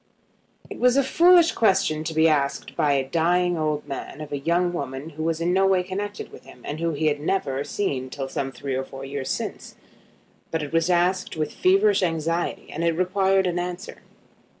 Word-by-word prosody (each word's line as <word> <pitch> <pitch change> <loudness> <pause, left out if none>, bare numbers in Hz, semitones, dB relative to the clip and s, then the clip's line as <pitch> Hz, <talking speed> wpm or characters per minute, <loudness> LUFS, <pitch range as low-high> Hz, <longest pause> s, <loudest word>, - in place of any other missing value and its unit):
It - - -9
was 250 +1 +4
a 275 - +4
foolish 345 +5 +5
question 190 -8 +2
to 160 - -3
be 160 +1 +5
asked 140 -3 0
by 145 -1 +2
a 135 -1 0
dying 175 +3 +1
old 155 -2 -2
man 135 +1 -6
of 155 -1 -8
a 145 - -2
young 175 +4 +1
woman 135 -1 -5
who 155 +1 -8
was 165 0 -1
in 170 +2 0
no 195 +1 +3
way 190 -1 +3
connected 205 +3 -5
with - - -13
him, - - -16
and 150 +2 -5
whom 165 -2 -1
he 155 +2 -1
had 150 -1 +1
never 145 -4 -1
seen 135 -9 -3
till 135 0 -5
some 135 0 -3
three 135 +1 -5
or 130 +1 -1
four 135 0 -9
years 135 -1 -5
since. - - -4 0.7
But 160 -1 -2
it 150 - -7
was 165 +1 +2
asked 180 0 +1
with 155 -1 -2
feverish 395 - +3
anxiety, 165 -1 -2
and 165 - -4
it 170 -1 +1
required 190 +1 +2
an 175 -1 -1
answer. 180 +2 -6
165 Hz, 205 wpm, -24 LUFS, 145-185 Hz, 0.7 s, foolish